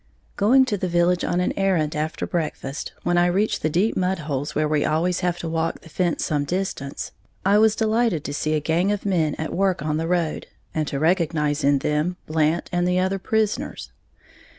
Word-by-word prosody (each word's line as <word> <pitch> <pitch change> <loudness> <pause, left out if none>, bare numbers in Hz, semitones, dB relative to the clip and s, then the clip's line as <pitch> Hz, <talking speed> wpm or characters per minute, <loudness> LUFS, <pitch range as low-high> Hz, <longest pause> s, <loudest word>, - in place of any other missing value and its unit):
_ - - -40
Going 255 +6 +5
to 210 -5 -1
the 185 - -2
village 175 +1 +2
on 175 - 0
an 180 - 0
errand 180 -6 +1
after 155 +1 -2
breakfast, 155 -4 -3
when 175 0 +2
I 175 - +4
reached 195 +5 +1
the 155 - +1
deep 185 +8 +1
mudholes 155 -7 -2
where 155 0 +2
we 150 -1 +1
always 170 +3 +1
have 175 -1 0
to 170 - -5
walk 165 0 -2
the 160 - -14
fence 175 +1 0
some 145 -2 0
distance, 155 -4 -3 0.3
I 200 +2 +5
was 220 0 +4
delighted 220 -6 +1
to 145 - -4
see 155 +1 0
a - - +2
gang 170 +6 +1
of 205 0 -3
men 165 -6 +1
at 155 - -4
work 190 -5 +1
on 155 0 0
the 165 +1 -2
road, 170 -3 -1 0.3
and 155 -2 -1
to 140 - -3
recognize 155 -2 +1
in 140 0 +4
them 150 +6 -1
Blant 155 +1 +1
and 175 0 +1
the 180 0 +2
other 190 +1 +1
prisoners. 215 +1 -1
170 Hz, 205 wpm, -23 LUFS, 155-190 Hz, 0.3 s, Going